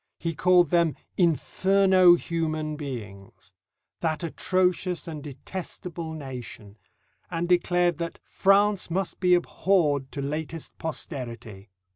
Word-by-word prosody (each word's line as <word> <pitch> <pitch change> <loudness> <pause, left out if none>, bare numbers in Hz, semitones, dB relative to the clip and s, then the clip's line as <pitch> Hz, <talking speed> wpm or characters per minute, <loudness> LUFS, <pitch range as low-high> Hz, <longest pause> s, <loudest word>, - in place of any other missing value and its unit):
He 165 -1 -3
called 180 +2 +4
them 170 -3 +2 0.2
"inferno 185 +2 +4
human 155 -3 -2
beings," 110 -10 -8 0.5
"that 160 +1 -1
atrocious 180 +1 0
and 155 -3 -6
detestable 165 +2 -6
nation," 125 -8 -8 0.5
and 170 0 -2
declared 175 -1 +2
that 170 0 -4
"France 200 0 +2
must 185 +2 -2
be 180 -1 +5
abhorred 165 -6 +1
to 145 - -5
latest 155 +2 -4
posterity." 115 - -6
165 Hz, 105 wpm, -26 LUFS, 145-180 Hz, 0.5 s, be